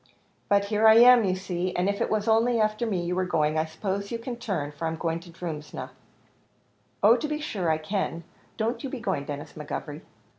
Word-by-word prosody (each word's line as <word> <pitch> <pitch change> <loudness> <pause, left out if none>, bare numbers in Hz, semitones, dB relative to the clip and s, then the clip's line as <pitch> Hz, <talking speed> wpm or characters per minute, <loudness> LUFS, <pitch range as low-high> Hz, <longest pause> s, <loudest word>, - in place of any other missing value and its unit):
"But 200 0 +3
here 210 +2 +3
I 220 - +8
am, 240 0 +8
you 185 -1 +1
see, 185 -1 -3
and 180 +2 +1
if 200 0 -1
it - - +1
was 215 0 0
only 230 +1 +3
after 215 +2 +1
me 185 -5 -1
you 175 +1 -2
were 185 - +1
going, 155 -4 +1
I 155 - +1
suppose 195 +5 -4
you 235 - -1
can 240 +1 -6
turn, 195 -12 -3
for 155 +3 -4
I'm 160 - -2
going 165 0 -2
to 175 +1 -14
Drumsna." 160 -3 -6 1.1
"Oh 220 +3 +7
to 250 +5 -2
be 300 0 -2
sure 200 - -2
I 160 - +2
can; 170 +1 -3 0.3
don't 230 +3 -2
you 270 - -3
be 265 - -5
going, 190 -11 -2
Denis 145 0 -6
McGovery." 150 0 -6
195 Hz, 220 wpm, -26 LUFS, 165-225 Hz, 1.1 s, I